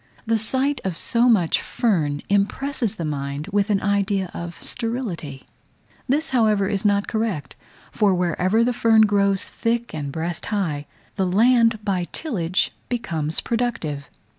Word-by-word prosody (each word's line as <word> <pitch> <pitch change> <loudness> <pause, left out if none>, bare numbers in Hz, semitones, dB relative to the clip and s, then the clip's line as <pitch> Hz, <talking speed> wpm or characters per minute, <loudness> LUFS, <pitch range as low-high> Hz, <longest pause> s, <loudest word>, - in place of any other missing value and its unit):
The 225 0 +1
sight 260 +4 0
of 185 -4 -3
so 235 +6 +2
much 185 -8 +3
fern 155 -11 0
impresses 220 +3 0
the 170 - -4
mind 140 0 -3
with 205 +1 +1
an 200 -2 +1
idea 200 -2 0
of 170 0 -7
sterility: 215 - -3 0.6
this, 295 +4 +1
however, 215 -6 +3
is 200 0 -1
not 205 -1 +2
correct; 220 -11 -2 0.4
for 210 -3 +3
wherever 180 +5 +2
the 245 +1 +1
fern 225 -2 +4
grows 200 -2 +3
thick 235 +1 -2
and 145 -3 -4
breast 165 +3 -4
high, 165 -9 -2 0.3
the 190 -2 +1
land 230 +2 +3
by 185 -4 0
tillage 185 - -1 0.2
becomes 165 -10 -2
productive. 225 -13 -2
200 Hz, 140 wpm, -23 LUFS, 170-230 Hz, 0.6 s, fern